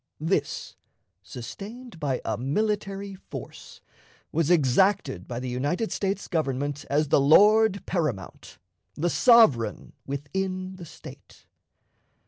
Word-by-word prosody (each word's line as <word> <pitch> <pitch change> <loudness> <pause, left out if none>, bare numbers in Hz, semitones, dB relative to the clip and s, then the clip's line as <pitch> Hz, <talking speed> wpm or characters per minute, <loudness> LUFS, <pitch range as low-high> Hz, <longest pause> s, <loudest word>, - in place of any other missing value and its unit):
This, 155 -2 -2 0.5
sustained 195 - -9
by 135 -4 -1
a - - -1
military 200 - -2
force, 190 - -10 0.5
was 165 0 0
exacted 155 - +2
by 120 -1 -4
the 130 - -5
United 145 - -1
States 195 0 -2
Government 145 -3 -2
as 150 +1 +1
the - - +5
lord 205 +7 +5
paramount 145 - -3 0.4
the 170 +3 0
sovereign 155 - +4
within 185 +7 -4
the 175 - -9
State. - - -14
165 Hz, 110 wpm, -26 LUFS, 135-195 Hz, 0.5 s, the